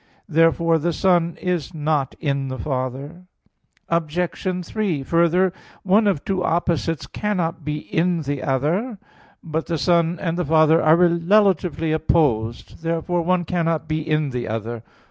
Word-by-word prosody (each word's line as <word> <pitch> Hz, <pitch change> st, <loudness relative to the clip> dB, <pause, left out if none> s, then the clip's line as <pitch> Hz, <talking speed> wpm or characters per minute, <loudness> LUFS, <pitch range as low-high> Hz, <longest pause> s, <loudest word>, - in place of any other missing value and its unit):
Therefore 165 Hz, 0 st, +3 dB
the 170 Hz, +2 st, -1 dB
Son 175 Hz, -2 st, +1 dB
is 180 Hz, -2 st, -2 dB
not 150 Hz, -3 st, -1 dB
in 140 Hz, -3 st, -1 dB
the 130 Hz, 0 st, -5 dB
Father. 135 Hz, +7 st, -4 dB, 0.6 s
Obj. 175 Hz, +2 st, -2 dB
3: 180 Hz, -8 st, -2 dB
Further, 170 Hz, +4 st, +2 dB, 0.3 s
one 205 Hz, +3 st, +3 dB
of 190 Hz, -8 st, 0 dB
two 190 Hz, -2 st, -1 dB
opposites 165 Hz, -2 st, 0 dB
cannot 175 Hz, -6 st, -2 dB
be 150 Hz, +1 st, -2 dB
in 165 Hz, +2 st, -1 dB
the 140 Hz, -1 st, -3 dB
other. 165 Hz, -, -1 dB, 0.5 s
But 160 Hz, -1 st, -3 dB
the 165 Hz, -, -1 dB
Son 170 Hz, +1 st, +2 dB
and 170 Hz, -2 st, -2 dB
the 180 Hz, -, 0 dB
Father 155 Hz, +1 st, +4 dB
are 155 Hz, +1 st, +5 dB
relatively 175 Hz, -1 st, +2 dB
opposed. 130 Hz, -7 st, 0 dB
Therefore 165 Hz, +1 st, -1 dB
one 175 Hz, +1 st, +1 dB
cannot 165 Hz, -2 st, -1 dB
be 155 Hz, 0 st, -1 dB
in 155 Hz, -2 st, 0 dB
the 125 Hz, -1 st, -3 dB
other. 115 Hz, +1 st, -4 dB
165 Hz, 145 wpm, -22 LUFS, 150-180 Hz, 0.6 s, are